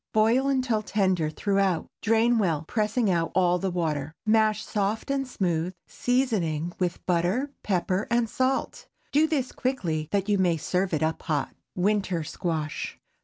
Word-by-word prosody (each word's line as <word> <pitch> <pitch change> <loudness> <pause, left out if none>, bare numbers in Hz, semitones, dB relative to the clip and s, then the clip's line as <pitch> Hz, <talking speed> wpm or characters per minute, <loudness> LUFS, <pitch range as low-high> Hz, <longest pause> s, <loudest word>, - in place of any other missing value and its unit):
Boil 230 +5 +3
until 255 -5 +1
tender 190 -7 +1
throughout. 195 0 +1 0.2
Drain 225 +1 +3
well, 165 -6 0
pressing 215 -1 +1
out 165 -2 0
all 180 -1 +3
the 195 - -1
water; 160 -4 -2
mash 215 0 +3
soft 210 +5 -1
and 270 -1 0
smooth, 180 -5 -1
seasoning 185 - 0
with 180 -1 -2
butter, 185 +11 +1
pepper, 185 0 0
and 235 -1 +2
salt. 260 +4 -1 0.2
Do 305 +3 +4
this 280 -5 -1
quickly, 170 - -2
that 200 -1 0
you 205 -2 +2
may 175 -3 +3
serve 180 +4 -1
up 160 +1 -1
hot. 150 -3 -1 0.2
WINTER 190 -3 +1
SQUASH. 155 -1 -3
195 Hz, 145 wpm, -26 LUFS, 170-225 Hz, 0.2 s, Do